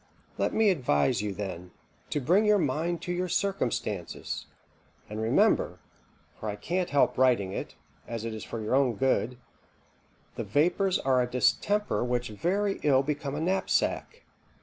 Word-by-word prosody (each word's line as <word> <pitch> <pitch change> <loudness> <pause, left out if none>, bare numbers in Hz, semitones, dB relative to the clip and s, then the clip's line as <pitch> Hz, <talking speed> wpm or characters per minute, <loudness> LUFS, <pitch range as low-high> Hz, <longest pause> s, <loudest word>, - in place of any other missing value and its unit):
Let - - +1
me 220 -2 +4
advise 85 - +1
you, 105 -1 -2
then, 95 -3 -6 0.4
to 150 - 0
bring 175 +10 +3
your 210 -1 +4
mind 165 +2 -1
to 175 - -3
your 180 +1 -1
circumstances, 125 - -2 0.6
and 105 +1 -5
remember 110 +1 +2 0.6
(for 110 - -4
I 105 - -3
can't 180 - -2
help 140 -3 +2
writing 120 -7 +3
it, - - -5 0.3
as 115 -1 -4
it 115 - -3
is 110 - -6
for 115 - -6
your 110 +2 -2
own 130 -3 +3
good) 125 0 +1 1.0
the - - -2
vapours 175 - +2
are 130 -1 +2
a 125 - -1
distemper 130 +13 +1
which 125 -1 -1
very 195 - -1
ill 135 -2 +4
become 145 -1 -3
a - - -2
knapsack. 190 - 0
130 Hz, 155 wpm, -28 LUFS, 110-175 Hz, 1.0 s, me